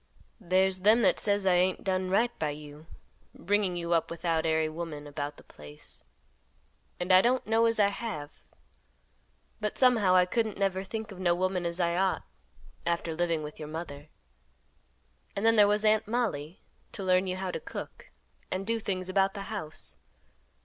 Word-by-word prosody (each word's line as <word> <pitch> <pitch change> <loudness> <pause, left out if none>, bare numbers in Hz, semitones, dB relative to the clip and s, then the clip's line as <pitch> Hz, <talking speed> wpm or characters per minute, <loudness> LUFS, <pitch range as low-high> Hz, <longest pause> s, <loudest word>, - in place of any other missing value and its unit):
"There's 190 -1 +2
them 215 +5 +5
that - - +4
says 205 -1 +1
I 185 - +4
ain't 180 +1 +2
done 185 -1 0
right 230 +6 +3
by 155 - 0
you, 150 +1 -9 0.5
bringing 200 -1 0
you 170 0 -1
up 165 - +1
without 165 -1 -1
ary 160 0 +2
woman 155 -2 -6
about 145 0 -5
the - - -15
place; 75 -3 -10 1.0
and 180 +1 -1
I 185 - +8
don't 250 +3 +1
know 225 +1 +3
as 230 -1 0
I 200 -1 +5
have, 200 -9 -5 1.3
but 210 -1 -3
somehow 225 -8 +4
I 180 0 +6
couldn't 220 +2 -1
never 195 -1 0
think 220 +2 -6
of 190 - -10
no 175 -2 +2
woman 185 -1 0
as 170 +1 -4
I 170 -1 +1
ought, 190 0 +1 0.6
after 170 -1 -1
living 165 -2 0
with 150 0 -8
your 155 - -6
mother. 155 -2 -7 1.3
And 200 - -1
then 225 0 +5
there 210 -2 +7
was 210 +1 +1
Aunt 215 0 +3
Mollie 200 -9 -2 0.3
to 200 - -5
learn 185 0 +3
you 185 - -1
how 185 -1 -3
to - - -4
cook - - -8 0.4
and 190 +1 -3
do 230 +2 0
things 185 -4 -3
about 195 +1 +2
the 200 - -5
house. 155 -7 -6
185 Hz, 175 wpm, -29 LUFS, 165-205 Hz, 1.3 s, I